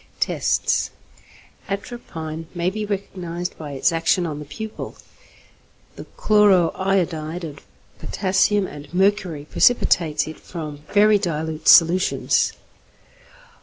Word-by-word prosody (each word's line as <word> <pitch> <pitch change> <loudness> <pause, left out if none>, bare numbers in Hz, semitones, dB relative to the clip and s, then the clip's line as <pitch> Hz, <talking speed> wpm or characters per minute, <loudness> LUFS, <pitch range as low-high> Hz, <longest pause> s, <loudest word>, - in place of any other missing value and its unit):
Tests. - - 0 0.8
Atropine 165 -7 -6
may 175 +1 0
be 215 +1 -4
recognized 180 -3 -4
by 150 -3 -7
its 140 +7 +2
action 165 +2 +1
on 150 -3 -4
the 150 - -8
pupil. 220 +9 -7 1.0
The - - -9
chloro 205 -5 +4
iodide 175 -3 -1
of 145 -3 -7 0.4
potassium 195 +1 +1
and 145 -4 -10
mercury 190 -6 +1
precipitates 165 -6 +2
it 155 - -8
from 155 -4 -7
very 210 0 +5
dilute 160 -4 -3
solutions. 175 +3 +4
175 Hz, 105 wpm, -22 LUFS, 155-195 Hz, 1.0 s, very